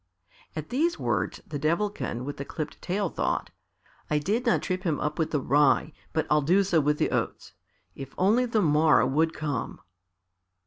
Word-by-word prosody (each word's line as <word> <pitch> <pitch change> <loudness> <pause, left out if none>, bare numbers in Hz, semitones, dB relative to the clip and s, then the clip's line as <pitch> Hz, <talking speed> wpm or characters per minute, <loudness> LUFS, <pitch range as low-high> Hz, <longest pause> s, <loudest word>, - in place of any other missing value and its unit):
At 155 -1 -5
these 325 +7 +1
words - - -1
the 145 - -5
Devilkin 165 - -1
with 145 - -5
the 140 - -4
clipped 155 +2 -6
tail 195 +2 -1
thought, - - -2 0.6
"I 150 - +2
did 215 - -1
not 160 -10 +2
trip 185 +3 -2
him 165 -6 -1
up 150 +2 -2
with 160 - +1
the 150 - 0
rye, 145 +2 +3 0.2
but 160 - 0
I'll 150 0 +3
do 180 +8 +3
so 175 -4 +2
with 150 +1 +1
the - - 0
oats. - - -3 0.4
If 135 -1 -9
only 225 +7 +3
the 220 -3 +1
morrow 155 -2 +4
would 155 +5 +2
come!" 145 -7 -4
155 Hz, 180 wpm, -27 LUFS, 150-195 Hz, 0.6 s, morrow